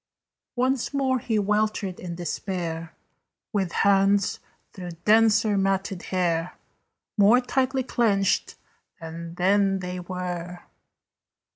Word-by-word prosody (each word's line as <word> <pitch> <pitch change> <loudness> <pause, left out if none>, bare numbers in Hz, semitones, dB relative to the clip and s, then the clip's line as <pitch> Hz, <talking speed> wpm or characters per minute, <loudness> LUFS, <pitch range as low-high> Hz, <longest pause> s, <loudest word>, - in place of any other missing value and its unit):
Once 260 +2 0
more 260 -2 +1
he 230 -2 -1
weltered 210 -2 0
in 175 -2 -6
despair, 170 -1 -4 0.6
With 190 -4 0
hands, 195 +1 +3 0.3
through 180 -2 -7
denser 220 -1 +4
matted 195 -1 -1
hair, 175 -2 -1 0.6
More 210 +5 +6
tightly 260 +1 0
clenched 205 -6 +1 0.4
than 165 +1 -8
then 195 +2 +2
they 180 -1 -5
were. 180 -1 -5
195 Hz, 100 wpm, -25 LUFS, 180-215 Hz, 0.6 s, More